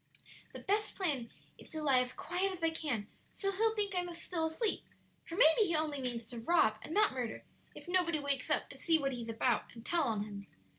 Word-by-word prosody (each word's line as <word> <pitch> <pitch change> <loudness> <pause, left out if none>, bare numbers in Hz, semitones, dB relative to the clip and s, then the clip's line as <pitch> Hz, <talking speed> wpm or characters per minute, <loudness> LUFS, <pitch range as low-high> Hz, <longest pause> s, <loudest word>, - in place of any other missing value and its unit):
The - - -6
best 420 +2 0
plan 280 - 0 0.3
is - - -12
to 315 -2 -4
lie 270 -4 +5
as 250 0 0
quiet 360 +7 -1
as 365 -3 -6
I 325 - +3
can, 265 -10 -2 0.2
so 395 -1 -1
he'll 440 +3 +2
think 410 -2 0
I'm 355 -1 -1
still 335 -1 -2
asleep; 400 +7 -1 0.4
for 335 - -7
maybe 360 +4 +6
he 340 - +1
only 305 -3 +1
means 240 -3 -3
to 235 +1 -7
rob, 225 -5 +3
and - - -9
not 420 0 +3
murder, 245 -4 -4 0.3
if - - -11
nobody 350 -3 +2
wakes 280 -1 -1
up - - +1
to - - -11
see 330 -2 +4
what 275 -3 -1
he's 235 -2 -6
about 230 +2 +1
and 230 0 -11
tell 330 -8 +2
of 210 -2 -1
him. 205 -1 -8
315 Hz, 225 wpm, -34 LUFS, 245-360 Hz, 0.4 s, maybe